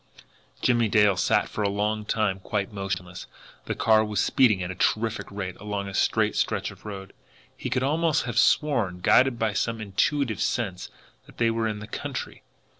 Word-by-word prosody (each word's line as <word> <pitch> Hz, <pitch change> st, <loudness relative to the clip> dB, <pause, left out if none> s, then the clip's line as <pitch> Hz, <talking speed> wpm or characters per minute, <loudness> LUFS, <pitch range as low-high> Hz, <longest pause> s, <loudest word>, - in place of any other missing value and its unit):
Jimmie 120 Hz, -3 st, +3 dB
Dale 105 Hz, -2 st, +4 dB
sat 90 Hz, -2 st, +2 dB
for -, -, -5 dB
a 100 Hz, -, +1 dB
long 105 Hz, +1 st, -1 dB
time 105 Hz, -3 st, 0 dB
quite 100 Hz, +2 st, -3 dB
motionless. 95 Hz, -3 st, -5 dB, 0.4 s
The -, -, -3 dB
car 110 Hz, -1 st, +4 dB
was 105 Hz, -2 st, -2 dB
speeding 110 Hz, -6 st, +3 dB
at 90 Hz, -, -4 dB
a -, -, -4 dB
terrific 110 Hz, +4 st, -1 dB
rate 95 Hz, -2 st, -5 dB
along 100 Hz, -1 st, -4 dB
a 100 Hz, -, -7 dB
straight -, -, +1 dB
stretch -, -, -1 dB
of -, -, -17 dB
road. 95 Hz, -2 st, -8 dB, 0.4 s
He -, -, -5 dB
could 130 Hz, -, 0 dB
almost 155 Hz, +3 st, +1 dB
have 120 Hz, -3 st, 0 dB
sworn, 115 Hz, -12 st, +2 dB
guided 125 Hz, +5 st, +4 dB
by 110 Hz, -2 st, 0 dB
some 115 Hz, +3 st, -1 dB
intuitive 110 Hz, +4 st, 0 dB
sense, 100 Hz, -7 st, -2 dB, 0.4 s
that -, -, -17 dB
they 115 Hz, -1 st, +2 dB
were 115 Hz, 0 st, 0 dB
in 105 Hz, -1 st, -4 dB
the 105 Hz, -, -8 dB
country. -, -, -6 dB
105 Hz, 185 wpm, -26 LUFS, 100-115 Hz, 0.4 s, Dale